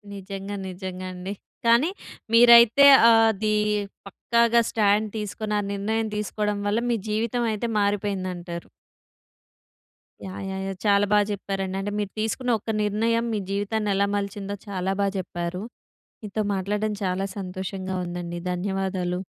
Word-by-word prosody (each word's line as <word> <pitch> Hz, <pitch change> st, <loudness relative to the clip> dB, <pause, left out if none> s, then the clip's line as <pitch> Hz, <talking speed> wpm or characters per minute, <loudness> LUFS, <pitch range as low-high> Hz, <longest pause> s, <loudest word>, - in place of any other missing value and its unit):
నిజంగా, 195 Hz, +1 st, -6 dB
నిజంగా 185 Hz, 0 st, -6 dB
అండి. 185 Hz, +2 st, -5 dB, 0.3 s
కానీ 235 Hz, +7 st, +5 dB, 0.4 s
మీరైతే 235 Hz, +3 st, +8 dB, 0.3 s
ఆదీ 220 Hz, -1 st, +3 dB, 0.5 s
పక్కాగా 235 Hz, +3 st, +2 dB
స్టాండ్ 210 Hz, 0 st, +2 dB
తీసుకొని, 210 Hz, +1 st, -4 dB
ఆ -, -, 0 dB
నిర్ణయం 220 Hz, +3 st, -1 dB
తీసుకోవడం 210 Hz, 0 st, -2 dB
వల్ల, 210 Hz, +3 st, +1 dB
మీ 235 Hz, -, +1 dB
జీవితం 230 Hz, +3 st, 0 dB
అయితే 220 Hz, +2 st, -2 dB
మారిపోయిందంటారు. 185 Hz, -4 st, -2 dB, 1.6 s
యాహ్! 190 Hz, 0 st, -7 dB
యాహ్! 190 Hz, 0 st, -4 dB
యాహ్! 195 Hz, -, -4 dB
చాలా 200 Hz, 0 st, +4 dB
బాగా 210 Hz, -1 st, +4 dB
జెప్పారండి. 195 Hz, -1 st, -3 dB
అంటే 205 Hz, +1 st, -3 dB
మీరు 205 Hz, -2 st, -3 dB
తీసుకున్న 245 Hz, +3 st, -1 dB
ఒక్క 220 Hz, -, -4 dB
నిర్ణయం 225 Hz, +3 st, +1 dB
మీ 210 Hz, -, 0 dB
జీవితాన్ని 205 Hz, +1 st, -1 dB
ఎలా 200 Hz, +1 st, +2 dB
మలిచిందో 200 Hz, 0 st, -3 dB
చాలా 190 Hz, -1 st, -2 dB
బా 200 Hz, -, +2 dB
జెప్పారు. 175 Hz, 0 st, -4 dB, 0.6 s
మీతో 210 Hz, +1 st, -2 dB
మాట్లాడడం 205 Hz, +2 st, -1 dB
చాలా 190 Hz, +1 st, -1 dB
సంతోషంగా 190 Hz, 0 st, -5 dB
ఉందండి. 175 Hz, 0 st, -5 dB
ధన్యవాదాలు. 185 Hz, -1 st, -2 dB
200 Hz, 125 wpm, -25 LUFS, 190-215 Hz, 1.6 s, మీరైతే